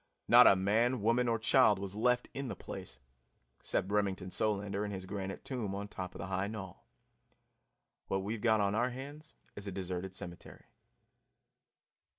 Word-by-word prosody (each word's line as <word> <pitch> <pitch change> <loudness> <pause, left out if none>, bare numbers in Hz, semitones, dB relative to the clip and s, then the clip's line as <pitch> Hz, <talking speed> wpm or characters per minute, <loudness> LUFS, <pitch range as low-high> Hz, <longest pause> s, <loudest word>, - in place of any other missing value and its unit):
Not - - +9
a - - +7
man, 110 +5 +1
woman 120 +2 +3
or 115 -1 +2
child 110 -1 +4
was 100 0 -5
left 125 +3 +2
in 140 0 -4
the - - -4
place 90 -9 -8 0.6
except 95 - -1
Remington 100 -3 0
Solander 100 -1 0
in 105 - -3
his 95 -2 -5
granite 95 0 -5
tomb 115 -7 -3
on 100 +1 -4
top 95 -2 -7
of - - -8
the - - -4
high 95 +1 -1
knoll. 100 -4 -8 1.2
What 95 0 -1
we've 105 +2 -3
got 110 -3 +3
on 100 0 +1
our 120 +4 +2
hands 145 +5 -9 0.2
is 100 0 -6
a - - -3
deserted 95 0 -4
cemetery. 85 -1 -9
100 Hz, 165 wpm, -33 LUFS, 95-115 Hz, 1.2 s, Not